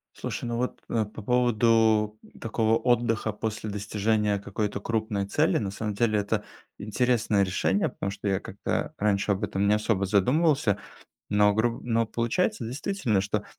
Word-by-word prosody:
Слушай, - - -4
ну 120 0 -2
вот, 125 +1 -2
э, 115 -2 +1
по 105 +1 -10
поводу 115 -2 +3 0.2
такого 115 0 +1
отдыха 115 -3 +1
после 110 0 -4
достижения 105 0 0
какой-то 100 +1 -3
крупной 110 -2 -1
цели- 95 - +2
на 100 - -2
самом 105 +1 -4
деле, 110 0 +2
это 105 +1 -1 0.3
интересное 110 -1 +1
решение. 95 +1 +1
Потому 100 - -4
что 100 +1 -4
я 95 -1 +1
как-то - - -3
раньше 100 0 +1
об 95 - -2
этом 100 +1 0
не 105 - +5
особо 105 -2 0
задумывался. 125 - +2 0.5
Но 105 0 +4
груб 115 +2 0
но 115 -1 +1
получается, 120 - -1
действительно, 125 - -1
что 105 +2 -2
110 Hz, 155 wpm, -27 LUFS, 100-115 Hz, 0.5 s, не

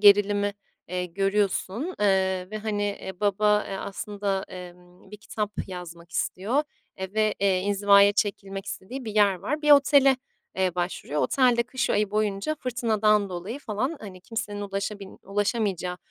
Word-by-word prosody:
gerilimi, 205 0 +5 0.4
eee, 180 0 -2
görüyorsun, 200 - -1
eee, 190 -2 +2
ve, 215 - -4
hani, 210 -1 -2 0.2
eee, 190 -2 -8
baba, 210 +1 +3
eee, 195 - -4
aslında, 200 0 -3
emm, 180 0 -12
bir 210 - -8
kitap 210 0 -4
yazmak 175 -2 -9
istiyor, 215 - 0 0.4
eee, 190 0 -3
ve, 215 -1 +2
eee, 195 -2 +3
inzivaya 200 +1 +5
çekilmek 200 -1 -2
istediği 245 +7 -6
bir 215 -2 -5
yer 205 -2 +5
var. 295 - -3
Bir 300 - +3
otele, 280 -1 +6 0.4
eee, 185 -2 +1
başvuruyor. 175 -4 -2
Otel 255 -3 +3
de 235 - +3
kış 260 +2 -2
ayı 210 -1 +1
boyunca 210 +5 0
fırtınadan 220 -6 +1
dolayı 185 +8 -5
falan, 260 +5 -2
hani, 190 -4 -9
kimsenin 210 0 -5
ulaşabil 200 0 -4
ulaşamayacağı, 195 -3 -1
205 Hz, 150 wpm, -26 LUFS, 190-215 Hz, 0.4 s, otele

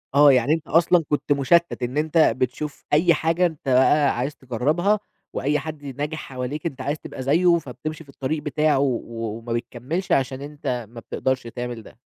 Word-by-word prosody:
آه، 145 0 +8
يعني 135 +4 +3
أنت 160 -2 -3
أصلًا 170 +1 +4
كنت 145 0 -1
مُشتّت 145 +2 +3
إن 125 +4 -2
أنت 155 +2 0
بتشوف 140 0 +1
أي 170 +3 +5
حاجة 165 +3 +1
أنت 155 -5 -3
بقى 130 +1 +4
عايز 135 +4 -2
تجرّبها، 150 - 0 0.3
وأي 150 +2 0
حد 150 0 -7
ناجح 145 +4 -4
حواليك 135 +4 -5
أنت 135 -5 -3
عايز 145 +3 -2
تبقى 130 - -7
زيه، 170 +5 +4
فبتمشي 155 +2 -6
في 140 - -23
الطريق 145 +3 -3
بتاعه 150 -1 +2
و 130 -4 +1 0.4
وما 115 0 -5
بتكمِّلش 125 +9 -4
عشان 135 0 +1
أنت 140 -5 -4
ما 120 0 -10
بتقدرش 130 +3 -2
تعمل 120 -1 -5
ده. 115 - -16
145 Hz, 180 wpm, -23 LUFS, 130-155 Hz, 0.4 s, آه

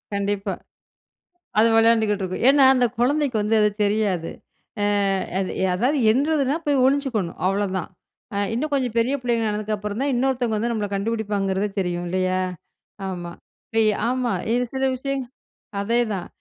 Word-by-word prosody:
கண்டிப்பா. 200 0 -1 1.1
அது 225 +2 +6
விளையாண்டுகிட்டு 220 -3 +3
இருக்கும். 185 +5 -3
ஏனா. 275 -1 +6
அந்த 250 -2 +3
குழந்தைக்கு 275 0 +1
வந்து 215 +2 +1
அது 210 0 +4
தெரியாது. 200 -5 0 0.5
அ - - +2 0.5
அது 190 - -2 0.2
அதாவது 250 +10 +1
எண்றதுனா 285 +1 +1
போய் 280 -3 +3
ஒளிஞ்சுக்கணும் 260 -10 0
அவ்வளோதான். 190 -2 -1 0.5
அ - - -2 0.2
இன்னும் 295 +6 -2
கொஞ்சம் 255 -5 -1
பெரிய 250 +5 +2
பிள்ளைங்க 235 -3 0
ஆனதுக்கு 215 0 -2
அப்புறம் 210 +3 -4
தான், 280 - 0
இன்னொருத்தவங்க 245 -3 0
வந்து 235 +3 -1
நம்மளை 210 -3 -2
கண்டுபிடிப்பாங்கிறத 200 -2 -1
தெரியும் 175 -1 -2
இல்லையா? 185 +1 0 0.7
ஆமா, 175 -2 -5 0.5
இ - - +3 0.2
ஆமா 250 -1 0 0.2
இது 245 +1 +2
சில 265 0 0
விஷயம் 275 0 -3 0.6
அதே 230 +4 +1
தான். 180 -3 -4
220 Hz, 145 wpm, -23 LUFS, 200-255 Hz, 1.1 s, அது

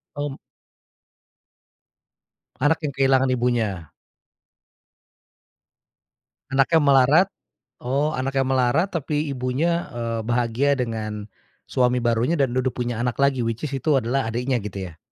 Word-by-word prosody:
Om 145 -1 -4 2.2
Anak 145 +5 +1
yang 145 -3 -3
kehilangan 135 -1 +3
ibunya. 110 -10 -1 2.6
Anaknya 135 +4 +3
melarat 140 +5 +5 0.6
oh, 140 +5 0
anaknya 135 +1 0
melarat, 130 +7 +2
tapi 150 -1 -2
ibunya, 140 +7 0
eee, 115 -1 -3
bahagia 120 +4 +1
dengan, 110 -3 -4 0.4
suami 125 0 +2
barunya 120 +7 +1
dan 130 -2 +1
duduk 130 0 0
punya 120 -2 -2
anak 125 +1 -2
lagi 135 -3 +2
which 115 +4 -3
is 135 - -4
itu 140 0 +2
adalah 130 +3 -1
adiknya, 125 +2 -1
gitu 95 -2 -5
ya? 80 - -20
130 Hz, 115 wpm, -23 LUFS, 120-140 Hz, 2.6 s, melarat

